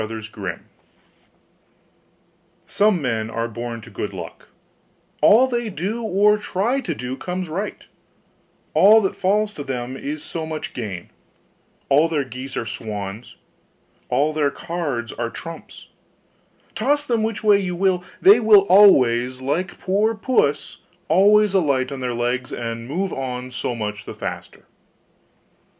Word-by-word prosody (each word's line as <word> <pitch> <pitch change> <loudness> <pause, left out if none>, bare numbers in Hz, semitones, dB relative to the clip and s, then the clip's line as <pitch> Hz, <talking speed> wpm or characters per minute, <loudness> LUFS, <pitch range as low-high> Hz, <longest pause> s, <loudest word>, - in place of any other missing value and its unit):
HANS 110 0 -6
IN 105 - -10
LUCK 95 - -3 2.1
Some 205 -4 +2
men 110 -3 -1
are 115 0 -2
born 115 0 -6
to 115 - -13
good 100 0 -5
luck: 85 -3 -9 0.7
all 230 +5 +6
they 240 -3 -2
do 200 +6 -3
or 210 0 +3
try 210 +6 -1
to 170 - -4
do 125 0 -5
comes 180 +5 -4
right 190 +7 -4 0.9
all 215 +3 +7
that 190 - -1
falls 210 +2 +1
to 145 - -6
them 130 -2 -4
is 145 +3 -5
so 160 -2 -5
much 155 -1 -5
gain 100 -8 -6 0.8
all 150 +4 +4
their 150 -3 0
geese 130 +1 -8
are - - -2
swans 105 0 -6 0.7
all 150 +2 +1
their 150 -2 +1
cards 145 -8 -4
are 115 0 -3
trumps 165 +6 -10 0.8
toss 290 +6 0
them 235 -5 0
which 220 -1 -2
way 205 -2 +5
you 180 -3 -3
will, 185 -1 +1 0.2
they 205 +4 +7
will 215 -3 +6
always, 130 - +5
like 150 +8 -2
poor 210 +4 +1
puss, 215 - 0 0.3
alight 190 -8 +3
upon 135 - -5
their 125 -2 -3
legs, 125 +2 -2
and 115 0 -5
only - - -4
move 190 0 -1
on 130 -1 -5
so 125 -1 -3
much 105 -1 -5
the - - -8
faster. - - -7
150 Hz, 145 wpm, -21 LUFS, 120-200 Hz, 2.1 s, all